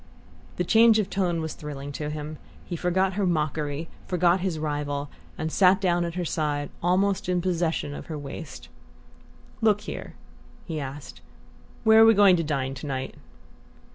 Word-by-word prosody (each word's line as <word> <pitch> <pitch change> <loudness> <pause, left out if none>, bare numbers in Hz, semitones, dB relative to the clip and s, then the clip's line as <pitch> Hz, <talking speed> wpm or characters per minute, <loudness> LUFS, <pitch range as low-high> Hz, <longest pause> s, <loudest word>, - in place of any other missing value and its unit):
The 180 - 0
change 225 +4 +6
of 205 -2 -1
tone 175 -4 0
was 160 -1 -4
thrilling 145 -1 -7
to 150 +1 -4
him. 150 0 -6 0.3
He 175 - -4
forgot 185 +3 +1
her 195 0 0
mockery, 150 -1 -1 0.2
forgot 180 0 +3
his 180 -3 -2
rival, 145 -2 -3 0.3
and 160 0 -3
sat 190 +1 +5
down 175 -2 +1
at 170 0 -5
her 180 -1 -2
side, 145 -2 -2
almost 190 +3 +1
in 180 -1 +2
possession 170 -4 -1
of - - -8
her 155 - -5
waist. 145 +2 -8 0.9
"Look 210 -2 +3
here," - - -7 0.5
he 160 -3 -4
asked, 140 +1 -8 0.6
"where 220 0 +7
are - - +9
we 225 0 +6
going 200 -2 +7
to 165 - 0
dine 135 -3 -2
to 135 +3 -7
night?" 135 -1 -3
165 Hz, 170 wpm, -26 LUFS, 150-185 Hz, 0.9 s, are